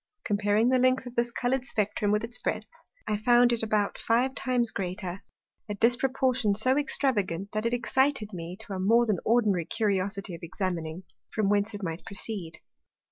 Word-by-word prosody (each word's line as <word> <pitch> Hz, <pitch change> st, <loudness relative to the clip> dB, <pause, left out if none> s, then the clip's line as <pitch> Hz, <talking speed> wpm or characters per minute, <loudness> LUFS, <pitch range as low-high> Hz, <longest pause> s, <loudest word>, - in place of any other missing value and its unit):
Comparing 205 Hz, +2 st, +2 dB
the 255 Hz, 0 st, +3 dB
length 255 Hz, +1 st, +2 dB
of 245 Hz, -, -8 dB
this 240 Hz, 0 st, +1 dB
colour'd 245 Hz, +2 st, -1 dB
Spectrum 210 Hz, -3 st, -1 dB
with 210 Hz, +1 st, +1 dB
its 235 Hz, +1 st, -6 dB
breadth, -, -, -3 dB, 0.3 s
I 210 Hz, -, 0 dB
found 240 Hz, +2 st, +4 dB
it 235 Hz, -, +1 dB
about 215 Hz, -2 st, 0 dB
five 245 Hz, +3 st, +1 dB
times 245 Hz, -4 st, 0 dB
greater; 185 Hz, 0 st, -4 dB, 0.5 s
a 210 Hz, -, -2 dB
disproportion 245 Hz, -1 st, +2 dB
so 255 Hz, +5 st, +3 dB
extravagant, 205 Hz, -, 0 dB
that 215 Hz, +2 st, -1 dB
it 235 Hz, -, -2 dB
excited 260 Hz, -3 st, +1 dB
me 175 Hz, +1 st, -6 dB
to 210 Hz, -, -8 dB
a 190 Hz, -, -3 dB
more 230 Hz, +5 st, +4 dB
than 210 Hz, -6 st, 0 dB
ordinary 215 Hz, -7 st, +2 dB
Curiosity 200 Hz, -3 st, -1 dB
of 165 Hz, -, -8 dB
examining, 170 Hz, -1 st, -4 dB, 0.3 s
from 215 Hz, -3 st, 0 dB
whence 205 Hz, +1 st, +1 dB
it 205 Hz, -, -7 dB
might 165 Hz, -1 st, -4 dB
proceed. 195 Hz, -5 st, -6 dB
215 Hz, 175 wpm, -28 LUFS, 195-240 Hz, 0.5 s, found